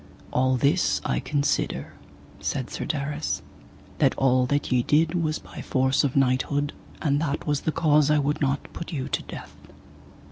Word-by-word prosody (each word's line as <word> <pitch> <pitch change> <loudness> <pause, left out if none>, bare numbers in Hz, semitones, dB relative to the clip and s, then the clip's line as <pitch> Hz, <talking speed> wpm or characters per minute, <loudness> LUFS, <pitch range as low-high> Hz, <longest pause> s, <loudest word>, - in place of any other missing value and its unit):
All 130 0 +3
this 145 +8 +2
I - - +1
consider, 145 -1 -1 0.5
said - - -3
Sir - - -4
Darras, 150 +1 -2 0.6
that - - +3
all 130 -1 +3
that 145 +1 0
ye 125 -1 +4
did 155 +6 +2
was 160 -3 0
by - - -10
force 130 0 +2
of 140 -3 0
knighthood, 140 +2 +1 0.3
and 145 -1 +2
that 150 -2 -2
was 145 -2 0
the 160 - 0
cause 150 -3 +3
I 150 - +4
would 145 +1 0
not 140 0 -1
put 170 - -6
you 135 -5 -3
to - - -1
death. - - -9
145 Hz, 170 wpm, -25 LUFS, 135-150 Hz, 0.6 s, ye